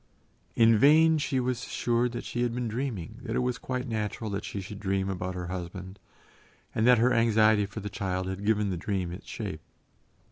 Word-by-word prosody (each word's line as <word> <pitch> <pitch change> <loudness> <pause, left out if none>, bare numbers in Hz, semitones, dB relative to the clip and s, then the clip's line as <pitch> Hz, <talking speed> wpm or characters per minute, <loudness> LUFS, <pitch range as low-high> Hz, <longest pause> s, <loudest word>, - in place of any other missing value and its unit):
In 115 -1 +5
vain 155 +4 +6
she 140 -3 0
was 125 -1 -1
assured 120 0 0
that - - -4
she 120 - -3
had 120 -1 0
been 125 -1 -2
dreaming, 110 -4 -4
that 115 -3 -4
it - - +2
was 125 -1 -1
quite 130 0 -3
natural 110 -1 -3
that 100 - -3
she 100 - -5
should 100 +1 -7
dream 95 -1 -1
about 90 0 -4
her 90 -1 -4
husband, 95 +1 -6 0.7
and 110 - +2
that 125 0 +7
her 125 +3 +3
anxiety 110 -2 +4
for 105 +2 -7
the 105 - -5
child 95 -2 -3
had 95 +1 -4
given 105 -1 +1
the 90 - -2
dream 90 -1 -2
its 90 +4 -9
shape. 100 -10 -5
110 Hz, 205 wpm, -28 LUFS, 95-120 Hz, 0.7 s, that